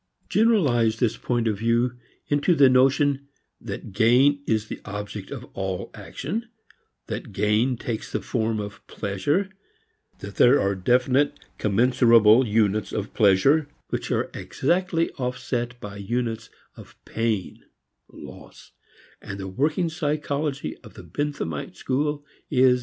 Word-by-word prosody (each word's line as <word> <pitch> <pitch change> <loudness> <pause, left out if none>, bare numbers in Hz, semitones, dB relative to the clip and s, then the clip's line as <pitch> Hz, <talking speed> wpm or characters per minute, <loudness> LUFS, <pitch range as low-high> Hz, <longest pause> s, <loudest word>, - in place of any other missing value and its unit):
Generalize 140 - +3
this 115 -2 +1
point 120 -2 -1
of 105 -3 -1
view 120 +2 +1 0.3
into 145 +4 +2
the 140 -3 +6
notion 135 +2 +3 0.3
that - - -7
gain 125 +7 +4
is 110 -1 +1
the - - -8
object 105 0 -6
of - - -7
all 95 -2 -4
action; 220 - -5 0.6
that - - -6
gain 110 +5 +1
takes 115 -2 -5
the - - -1
form 110 -2 -1
of 105 -1 -7
pleasure; 145 - -1 0.7
that 100 0 -9
there 130 +4 +6
are 100 0 +1
definite, 125 +8 +2 0.2
commensurable 115 +1 +5
units 105 -1 +1
of 105 -1 -4
pleasure, 110 +10 +4 0.2
which - - -3
are - - -1
exactly 170 +2 0
offset 125 -1 -3
by 105 -2 -8
units 115 +2 -3 0.3
of - - -14
pain 110 -4 -2 0.5
(loss), - - -13 0.5
and 100 -1 -7
the 95 - -5
working 150 - 0
psychology 150 -3 -2
of - - -16
the - - -10
Benthamite 145 - -4
school 145 +2 -2 0.2
is 130 - 0
at 130 0 +7
hand. 125 0 +3
120 Hz, 135 wpm, -24 LUFS, 105-145 Hz, 0.7 s, at